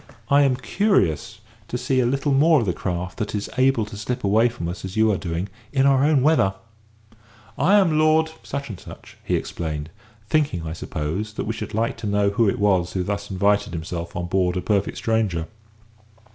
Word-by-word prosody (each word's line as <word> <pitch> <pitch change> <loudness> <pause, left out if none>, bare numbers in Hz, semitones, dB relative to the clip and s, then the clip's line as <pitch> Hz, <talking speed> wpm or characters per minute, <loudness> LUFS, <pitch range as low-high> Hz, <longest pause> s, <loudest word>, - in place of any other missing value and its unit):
I 140 +1 +6
am 135 -3 +3
curious 115 - 0 0.3
to 125 - -3
see 130 +1 0
a 120 - +3
little 135 +3 0
more 150 +3 +5
of - - -1
the 90 - 0
craft 90 +1 -4
that 105 0 -2
is 105 - -4
able 130 -4 +3
to 105 - -10
slip 115 +4 -4
away 110 +4 +4
from 115 -8 -6
us 90 +2 -6
as 95 +2 -6
you 110 0 +4
are - - +1
doing, 85 +2 -3 0.2
in 135 -2 +2
our 135 -1 +4
own 145 -3 +3
weather. 140 -11 +3 1.0
I 180 +8 +3
am 170 -7 +4
Lord 160 +1 +3 0.5
," - - -13
he - - 0
explained, 80 -2 -4 0.4
thinking, 140 - 0
I 80 - -4
suppose, 85 +7 -4
that - - -4
we 110 - -2
should 105 - -6
like 115 +1 0
to 115 -2 -5
know 100 0 +2
who 105 +1 +3
it - - -1
was 95 -4 +2
who 95 - -1
thus 100 +1 -3
invited 100 0 +1
himself 85 +1 -5
on 85 0 -2
board 90 0 0
a - - -1
perfect 100 +1 0
stranger. 105 -8 0
105 Hz, 200 wpm, -23 LUFS, 90-130 Hz, 1.0 s, I